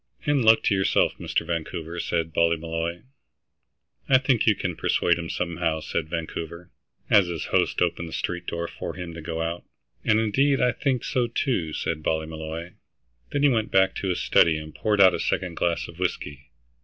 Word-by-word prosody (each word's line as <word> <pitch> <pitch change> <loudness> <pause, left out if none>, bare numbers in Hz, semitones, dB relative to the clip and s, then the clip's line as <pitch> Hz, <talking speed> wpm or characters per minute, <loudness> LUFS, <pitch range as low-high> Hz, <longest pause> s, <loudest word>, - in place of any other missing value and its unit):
"And 145 -3 +2
luck 110 0 +6
to - - +2
yourself, 95 -1 +2
Mr. - - -1
Vancouver," 85 0 -4
said 80 -1 -1
Ballymolloy. 85 +1 0 1.1
"I 130 - +7
think 130 -4 +1
you 105 - +6
can 90 -3 -3
persuade 85 +1 +1
him, 85 -1 -5
somehow," 85 -2 -1
said 80 - -3
Vancouver, 85 +1 -5 0.4
as 100 -4 +6
his 85 -3 -4
host - - +2
opened 85 -1 -2
the - - -10
street 90 0 -3
door 85 0 -3
for - - -6
him 90 -2 -6
to 85 - -8
go 80 +1 -3
out. 85 +1 -4 0.4
"And, 110 0 +3
indeed, 135 +6 +2
I 125 0 +3
think 130 0 -1
so 125 -2 0
too," 115 - -1
said 80 0 -2
Ballymolloy. 80 +2 -3 0.6
Then 145 - -1
he 145 - +6
went 115 -4 0
back 95 0 +3
to 100 - -3
his 90 - 0
study 80 -2 +4
and 75 0 -8
poured 105 -1 0
out 95 -2 +8
a - - -2
second 90 -3 -1
glass 85 0 0
of 85 - -13
whiskey. 75 -5 -3
85 Hz, 185 wpm, -25 LUFS, 80-105 Hz, 1.1 s, out